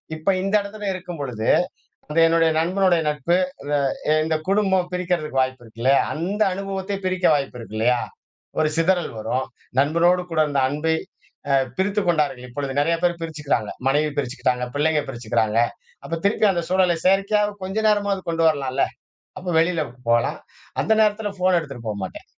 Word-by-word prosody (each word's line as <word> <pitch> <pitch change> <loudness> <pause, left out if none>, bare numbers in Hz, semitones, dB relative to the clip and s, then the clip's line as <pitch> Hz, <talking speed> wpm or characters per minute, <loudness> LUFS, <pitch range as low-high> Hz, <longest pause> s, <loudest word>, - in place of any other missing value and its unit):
இப்ப 155 +5 +1
இந்த 195 +2 +1
இடத்துல 205 +1 -6
இருக்கும்பொழுது 145 -11 -5 0.6
அந்த 150 - -4
என்னுடைய 165 0 +3
நண்பனுடைய 180 0 +2
நட்பு, 150 +4 +1 0.9
இந்த 160 0 0
குடும்பம் 190 -2 +2
பிரிக்கிறதுக்கு 175 -6 -1
வாய்ப்பு 130 -1 -2
இருக்கு 115 0 -13
இல்லையா. 135 +3 +4
அந்த 185 +7 -3
அனுபவத்தை 195 +1 -3
பிரிக்க 185 0 0
வாய்ப்பு 135 -3 -3
இருக்கு 110 -2 -9
இல்லையா. 120 +2 +2 0.6
ஒரு 155 - +3
சிதறல் 175 +1 +2
வரும். 130 +4 -2 0.3
நண்பனோடு 170 +5 +3
கூட 160 -1 +2
இருந்த 145 -2 0
அன்பை 155 +3 0 0.6
அ - - +5 0.2
பிரித்துக் 200 +1 0
கொண்டார்கள் 150 -6 0
இப்பொழுது. 140 +2 -4
நெறையா 165 +3 +2
பேரு 175 -1 +2
பிரிச்சுக்கிறாங்க. 150 -9 -2 0.2
மனைவி 150 +3 +2
பிரிச்சுக்கிட்டாங்க, 125 -2 -1
பிள்ளைங்க 150 +1 +2
பிரிச்சுக்கிறாங்க. 110 -3 -1 0.5
அப்போ 165 - -3
திருப்பி 205 +2 +3
அந்த 175 -2 -1
சூழலை 185 -2 +3
செயற்கையாக 200 +2 +2
கொஞ்ச 190 +3 -4
நேரமாவது 205 -2 +1
கொண்டு 165 0 0
வரலாம்ல? 135 -3 0 0.6
அப்போ 185 -1 -4
வெளியில 165 0 +2 0.3
போலாம். 115 0 +2 0.4
அந்த 220 - +1
நேரத்தில 210 0 +2
ஃபோன 185 0 +2
எடுத்துட்டு 140 -7 -7
போமாட்டேன் 100 -3 -5
165 Hz, 145 wpm, -22 LUFS, 135-185 Hz, 0.9 s, அ